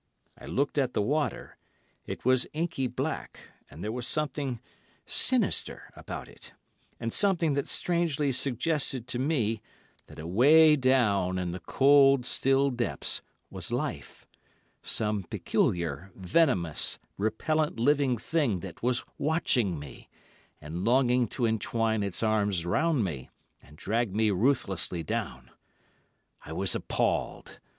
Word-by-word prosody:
I - - -13
looked 140 +2 0
at 130 -3 -1
the - - +2
water: 145 +6 -2 0.5
it - - -6
was 130 0 +3
inky 155 -4 -1
black, - - -4 0.3
and 80 - -10
there 105 - -2
was 125 +1 -3
something 145 -5 -1 0.5
sinister - - +1
about - - -7
it, - - -13 0.6
something 170 - +3
that 140 0 -1
strangely 165 -5 +1
suggested 130 0 -1
to 125 - -1
me, 120 -7 0 0.5
that - - -14
away 145 - +5
down 110 -9 +2
in 90 -1 -2
its 90 -1 -8
cold, 135 -2 +5
still 135 +1 +2
depths 120 -1 -2 0.3
was - - -2
life—some 105 -2 -4
peculiar, 85 +1 -1
venomous, 95 - +1 0.2
repellant 150 +7 0
living 135 0 +2
thing 120 - 0
that 90 -2 -9
was 125 +1 0
watching 130 - +1
me, 70 -1 -11 0.5
and 80 +5 -6
longing 125 +1 +3
to 120 +3 -2
entwine 110 0 0
its 100 +1 -2
arms 105 -5 +1
round 150 - +1
me, 75 -9 -5 0.3
and 75 +2 -18
drag 110 +2 -1
me 110 -1 +2
ruthlessly 95 -6 0
down. 65 -4 -4 0.9
I - - -8
was - - +1
appalled. - - -2
120 Hz, 125 wpm, -28 LUFS, 100-140 Hz, 0.9 s, away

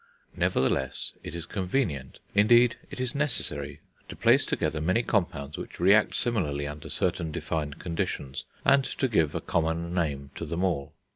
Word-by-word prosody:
Nevertheless 65 0 0
it 85 - -7
is 85 -1 -5
convenient, 90 - -2 0.2
indeed 115 +3 +6
it - - -8
is 130 -1 -1
necessary, 75 - -1 0.3
to - - -7
place - - +4
together 80 - -1
many 95 +9 +2
compounds 85 -10 -1
which - - -8
react 100 +4 +5
similarly 80 -12 0
under 75 0 -7
certain 80 -1 -1
defined 75 -1 -3
conditions, 80 -5 -3 0.2
and 140 0 +6
to 130 - -1
give 80 - +2
a - - -1
common 85 +1 -1
name 70 -6 -1
to 85 - -5
them 85 +4 -2
all. 85 -7 -1
85 Hz, 155 wpm, -28 LUFS, 75-105 Hz, 0.3 s, indeed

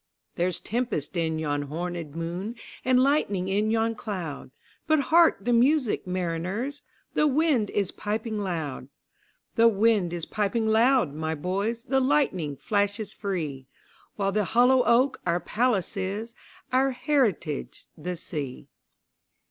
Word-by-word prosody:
There's 175 0 -1
tempest 230 - -2
in 160 -2 0
yon 145 -2 -1
hornèd 165 0 -5
moon, 175 +7 -4 0.3
And 255 0 +4
lightning 205 -10 +1
in 205 +3 +1
yon 225 0 +1
cloud:But 190 - -4
hark 315 -6 +4
the 245 - +2
music, 250 -3 +2
mariners! 185 - -2 0.3
The 300 - +3
wind 285 -7 +2
is 200 -3 -1
piping 215 +1 -3
loud; 160 -10 -3 0.7
The 230 0 +7
wind 210 -4 +3
is 175 -2 -3
piping 215 +2 -1
loud, 225 - +3
my 160 +1 -2
boys, 200 +9 -2
The 265 0 +1
lightning 255 - +1
flashes 205 - -1
free—While 175 +2 -5
the 210 0 +1
hollow 250 +6 +4
oak 250 +4 +3
our 170 0 +1
palace 215 +2 0
is, 200 +4 -3 0.4
Our 265 +1 +4
heritage 245 - -1
the 180 +3 -4
sea. 150 -6 -6
205 Hz, 125 wpm, -26 LUFS, 170-240 Hz, 0.7 s, The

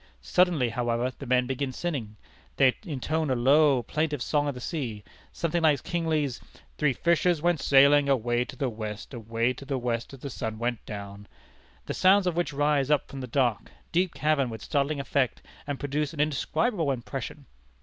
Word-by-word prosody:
Suddenly, 175 -9 +2
however, 120 +1 -1
the 140 - -9
men 125 0 +3
begin 135 +1 -2
singing. 130 -8 -4 0.4
They 130 -2 +5
intone 155 +1 -1
a 130 - +2
low, 135 +1 +4
plaintive 150 0 -1
song 145 -1 +1
of 140 - -2
the - - -7
sea; 120 -8 -4 0.3
something 170 0 -1
like 150 -4 +3
Kingsley's 155 -6 -1 0.4
'Three 150 -3 +3
fishers 170 +2 +2
went 170 0 +1
sailing 140 +1 +5
away 120 -2 +2
to - - -10
the 140 - -1
West, 110 0 -6
Away 115 +1 -1
to 130 - -11
the 135 -1 -2
West 120 -2 -2
as 130 - -17
the 140 - -5
sun 110 -3 -4
went 120 0 -2
down 100 -1 -8 0.3
' - - -31
the - - -3
sounds 190 +1 +4
of 180 -2 0
which 175 -4 0
rise 145 -1 +1
up 150 -1 +2
from 135 - -7
the 125 - -5
dark, 120 -3 0 0.2
deep 180 0 +1
cavern 150 -4 +1
with 110 -2 -7
startling 140 +1 0
effect, 135 -1 -1 0.2
and 145 -2 -3
produce 145 +1 -2
an - - -9
indescribable 155 - 0
impression. 130 -3 -5
140 Hz, 185 wpm, -27 LUFS, 120-155 Hz, 0.4 s, They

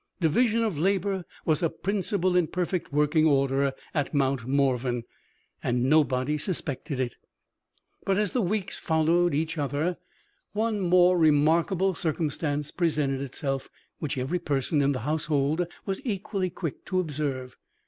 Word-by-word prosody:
Division 225 +7 +2
of 200 -10 -1
labor 195 +1 0 0.2
was 155 +1 +2
a 165 - +2
principle 190 -1 -1
in 175 -3 +3
perfect 180 -1 -2
working 150 +2 +3
order 140 -1 +2 0.2
at 145 -1 -1
Mount 135 -3 +1
Morven 130 -3 +1 0.6
and 120 0 0
nobody 145 0 +2
suspected 145 -6 -3
it! 125 -3 -2 0.9
But, 195 -1 +1
as 210 -2 +1
the 250 - +1
weeks 195 0 -1
followed 165 0 +2
each 160 +1 -1
other, 145 +5 -1 0.6
one 215 0 0
more 180 -1 +4
remarkable 165 +5 +3
circumstance 150 -3 -2
presented 150 -6 0
itself 135 0 -3 0.3
which 145 -4 -3
every 135 +8 -1
person 145 -1 0
in 140 0 +3
the 130 - -3
household 155 +3 0 0.2
was 195 +6 -3
equally 200 -5 -2
quick 165 -4 -5
to 185 - 0
observe. 140 -6 -3
155 Hz, 140 wpm, -27 LUFS, 140-180 Hz, 0.9 s, more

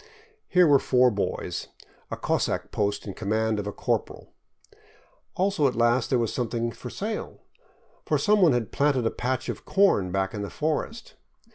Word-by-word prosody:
Here 180 -1 +5
were 145 -3 +6
four 125 -1 +3
boys, 100 -2 -3 0.4
a - - -4
cossack - - -1
post 100 -1 -1
in 100 - -5
command 110 +2 -1
of 105 - -4
a - - -2
corporal; - - -3 1.0
also 185 -6 +2
at 130 - -2
last 120 +1 +2
there 130 - +3
was 115 -2 -1
something 120 -1 -2
for 125 - -9
sale, 215 - -5 0.6
for - - +1
some 210 -1 +3
one 165 -7 +6
had 120 -3 -1
planted 140 -4 +1
a 115 - +1
patch 130 +1 -2
of - - -5
corn 190 - +2
back 95 0 -1
in 105 - -4
the 100 - -4
forest. 160 +9 -3
120 Hz, 170 wpm, -26 LUFS, 110-150 Hz, 1.0 s, were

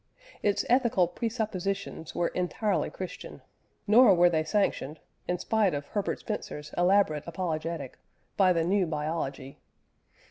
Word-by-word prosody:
Its 205 -1 +1
ethical 235 -8 +3
presuppositions 200 -4 -3
were 170 - +1
entirely 190 +3 -1
Christian, 185 -1 -8 0.4
nor 215 -1 +7
were 175 0 +5
they 160 -1 +1
sanctioned 160 -5 -1 0.3
(in 180 - 0
spite 210 -3 +1
of 145 0 -4
Herbert 205 -2 -2
Spencer's 155 -8 -6
elaborate 175 -4 +2
apologetic) 165 -5 -4 0.4
by 190 -3 +4
the 165 -2 +2
new 185 +1 +2
biology. 150 -3 -4
180 Hz, 120 wpm, -28 LUFS, 160-205 Hz, 0.4 s, nor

